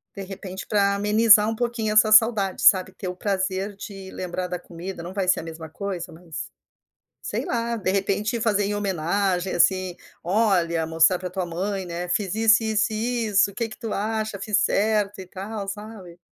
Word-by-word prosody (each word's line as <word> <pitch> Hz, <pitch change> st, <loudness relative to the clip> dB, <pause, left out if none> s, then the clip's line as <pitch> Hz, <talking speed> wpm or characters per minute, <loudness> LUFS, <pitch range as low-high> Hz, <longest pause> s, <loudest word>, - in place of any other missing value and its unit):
De 200 Hz, -, -6 dB
repente 190 Hz, 0 st, -8 dB
para 200 Hz, -1 st, +2 dB
amenizar 210 Hz, +1 st, +5 dB
um 225 Hz, -, -2 dB
pouquinho 230 Hz, -2 st, -1 dB
essa 215 Hz, 0 st, +6 dB
saudade 215 Hz, -3 st, +4 dB
sabe, 190 Hz, 0 st, +5 dB
ter 185 Hz, -1 st, -6 dB
o 180 Hz, -, -5 dB
prazer 195 Hz, 0 st, -2 dB
de 195 Hz, -1 st, -9 dB
lembrar 180 Hz, 0 st, -4 dB
da 180 Hz, 0 st, -3 dB
comida, 175 Hz, +1 st, -8 dB
não 180 Hz, -, -7 dB
vai 195 Hz, -2 st, -2 dB
ser 185 Hz, -, +3 dB
a -, -, -10 dB
mesma 160 Hz, -1 st, -8 dB
coisa 195 Hz, 0 st, -5 dB
mas, 165 Hz, -2 st, -8 dB, 0.7 s
sei -, -, -3 dB
lá, 235 Hz, -1 st, -2 dB
de 200 Hz, -4 st, -1 dB
repente 200 Hz, +4 st, 0 dB
fazer 210 Hz, -2 st, +1 dB
em 205 Hz, +1 st, -1 dB
homenagem 190 Hz, -1 st, -1 dB
assim, 185 Hz, +1 st, +2 dB, 0.3 s
olha 175 Hz, -5 st, +1 dB
mostrar 165 Hz, +3 st, +4 dB
para 180 Hz, -, -5 dB
tua 185 Hz, 0 st, -3 dB
mãe, 190 Hz, +3 st, -3 dB
né, 175 Hz, 0 st, -5 dB
"Fiz 195 Hz, +1 st, -1 dB
isso, 225 Hz, 0 st, +4 dB
isso, 220 Hz, -1 st, +1 dB
isso, 220 Hz, -3 st, +1 dB
o 200 Hz, -, -17 dB
que 230 Hz, 0 st, -2 dB
que -, -, -11 dB
tu 225 Hz, -3 st, -5 dB
acha, 215 Hz, 0 st, -2 dB
fiz 205 Hz, 0 st, +1 dB
certo 210 Hz, -1 st, +1 dB
e 185 Hz, -, -8 dB
tal" 195 Hz, +2 st, -6 dB
sabe? 200 Hz, -4 st, -8 dB
195 Hz, 190 wpm, -24 LUFS, 185-215 Hz, 0.7 s, essa